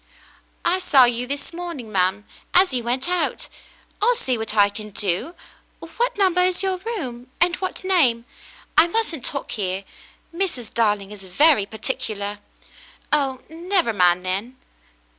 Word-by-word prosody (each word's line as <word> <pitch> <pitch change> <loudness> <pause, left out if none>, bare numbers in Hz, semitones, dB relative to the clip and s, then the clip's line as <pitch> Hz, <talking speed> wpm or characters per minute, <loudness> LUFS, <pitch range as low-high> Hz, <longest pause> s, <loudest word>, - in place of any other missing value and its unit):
" - - -36
I - - -2
saw 270 -8 +6
you 245 +1 0
this 280 +4 -4
morning, 335 -10 -7
ma'm, 190 +2 +1 0.3
as 365 -4 +6
you 250 - 0
went 250 +5 -1
out. 360 -1 -1 0.5
I'll 480 +3 +4
see 265 - -1
what 220 -1 -4
I 205 -1 +6
can 210 +1 -8
do. 200 - -2 0.6
What 485 -1 0
number 370 -3 +3
is 365 +1 +1
your 380 -1 0
room? 270 - -6
and 350 0 +3
what 370 0 -5
name? 275 -12 +2 0.5
I 320 +2 +7
mustn't 345 - -1
talk 275 -3 -2
here. 190 -2 -2 0.5
Mrs. 330 - -3
Darling 210 -3 +1
is 200 -2 -10
very 210 - +4
particular." 210 -3 -4 0.7
"Oh, 270 -3 +1
never 340 - 0
mind, 180 -2 +3
then." 200 +8 -3
255 Hz, 150 wpm, -22 LUFS, -, 0.7 s, I